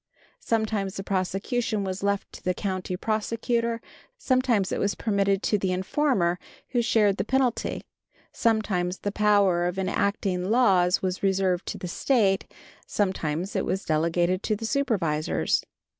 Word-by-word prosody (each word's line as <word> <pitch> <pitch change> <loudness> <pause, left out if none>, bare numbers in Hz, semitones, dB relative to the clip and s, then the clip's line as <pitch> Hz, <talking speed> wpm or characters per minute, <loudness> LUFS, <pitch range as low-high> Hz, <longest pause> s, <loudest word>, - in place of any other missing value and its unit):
Sometimes 215 -4 -1
the 195 - -4
prosecution 200 +4 -1
was 190 0 -4
left 200 0 -1
to - - -11
the 180 0 0
county 185 -1 -3
prosecutor; 230 +2 -1 0.4
sometimes 255 - +1
it - - -1
was 200 0 0
permitted 200 -2 +1
to 210 - +1
the 190 -1 0
informer, 185 - +1 0.3
who 245 - +1
shared 210 -4 +3
the - - 0
penalty; 260 +1 0 0.5
sometimes 200 -5 0
the 205 - -2
power 200 -4 +3
of 180 +1 -3
enacting 190 -1 -1
laws 195 -7 +3
was 185 0 -2
reserved 190 -2 +1
to - - -4
the 180 - -6
State; 195 0 +1 0.4
sometimes 185 -2 -1
it - - +1
was 190 - -2
delegated 170 +3 +1
to 215 - 0
the 225 +2 -5
supervisors. 195 - 0
195 Hz, 145 wpm, -26 LUFS, 185-220 Hz, 0.5 s, shared